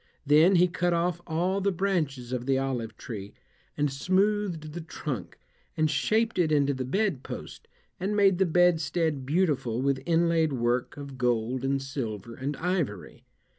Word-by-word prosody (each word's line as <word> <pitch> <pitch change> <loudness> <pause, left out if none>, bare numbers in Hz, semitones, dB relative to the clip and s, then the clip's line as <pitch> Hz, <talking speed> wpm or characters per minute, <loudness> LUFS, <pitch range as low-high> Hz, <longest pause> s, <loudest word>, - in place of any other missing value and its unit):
Then 155 +6 +6
he 180 +1 +5
cut 175 0 0
off 170 0 0
all 180 +4 0
the 200 +1 +2
branches 160 -10 -1
of 125 0 -3
the 135 -1 +3
olive 130 -4 -3
tree, 100 -3 -8 0.4
and 145 -2 0
smoothed 185 -1 0
the 175 - -5
trunk, 145 - -6 0.4
and 155 -1 +2
shaped 220 +7 +1
it 165 -3 +2
into 140 -2 +3
the 130 -1 -3
bed 190 - 0
post, - - -8 0.3
and 195 +3 -1
made 195 -3 +4
the 190 - +3
bedstead 160 -4 +2
beautiful 145 -8 +1
with 135 0 0
inlaid 165 -2 +2
work 120 +1 -1
of 140 -2 -8
gold 125 +1 0
and 135 0 0
silver 115 -5 -5
and 135 +4 -4
ivory. 165 - -3
150 Hz, 160 wpm, -27 LUFS, 130-180 Hz, 0.4 s, Then